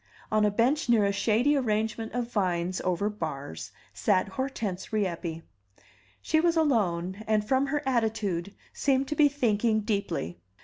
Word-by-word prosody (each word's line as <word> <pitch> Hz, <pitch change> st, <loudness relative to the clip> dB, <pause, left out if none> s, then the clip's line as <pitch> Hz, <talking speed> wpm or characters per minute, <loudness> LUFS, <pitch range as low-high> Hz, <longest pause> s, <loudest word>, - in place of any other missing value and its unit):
On 215 Hz, 0 st, +3 dB
a 210 Hz, -, +4 dB
bench 245 Hz, +8 st, +1 dB
near 225 Hz, -4 st, +5 dB
a 200 Hz, -, +2 dB
shady 225 Hz, +8 st, +2 dB
arrangement 225 Hz, -3 st, -1 dB
of 245 Hz, -1 st, -2 dB
vines 180 Hz, -3 st, 0 dB
over 185 Hz, +3 st, 0 dB
bars 145 Hz, -, -5 dB, 0.2 s
sat 105 Hz, -, +1 dB
Hortense 215 Hz, -5 st, -4 dB
Rieppe. 170 Hz, -6 st, -2 dB, 0.8 s
She 315 Hz, -, +2 dB
was 335 Hz, 0 st, +2 dB
alone, 195 Hz, -, +1 dB
and, 215 Hz, -1 st, +1 dB
from 265 Hz, +3 st, +2 dB
her 295 Hz, +2 st, -1 dB
attitude, 220 Hz, -7 st, -1 dB, 0.2 s
seemed 270 Hz, -1 st, +1 dB
to 300 Hz, -, -1 dB
be 295 Hz, -1 st, +5 dB
thinking 225 Hz, -5 st, +1 dB
deeply. 200 Hz, -, -2 dB
215 Hz, 145 wpm, -28 LUFS, 185-255 Hz, 0.8 s, near